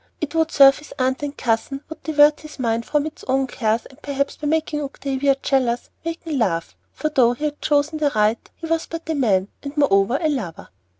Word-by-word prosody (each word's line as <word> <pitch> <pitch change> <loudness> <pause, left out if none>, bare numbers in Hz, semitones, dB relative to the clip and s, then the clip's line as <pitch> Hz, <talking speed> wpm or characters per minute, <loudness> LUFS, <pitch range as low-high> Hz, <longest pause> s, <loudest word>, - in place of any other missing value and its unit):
It 310 -1 -4
would 320 -1 +2
serve 275 -3 +7
his 300 - -13
aunt 260 +1 0
and 290 0 -4
cousin, 250 +4 -1
would 320 - -9
divert 300 -1 +4
his 305 0 -11
mind 230 -2 -1
from 295 -1 +1
its 315 - -8
own 270 +1 +2
cares, 225 -3 -1
and, 270 +2 -17
perhaps 280 -1 -2
by 300 - -4
making 310 -1 0
Octavia 275 -1 0
jealous, 245 -3 0
waken 330 -3 -3
love; 170 -7 0 0.2
for, 310 - -2
though 250 -5 +4
he 295 +5 -4
had 295 -1 -3
chosen 300 +1 +1
the 295 -2 +2
right, 215 +2 +1
he 335 - -8
was 330 0 -1
but 330 -1 -7
a - - +1
man, 205 -9 +1
and 285 +1 -8
moreover 235 -4 +3
a 320 - +1
lover. 245 - -4
280 Hz, 215 wpm, -22 LUFS, 245-305 Hz, 0.2 s, serve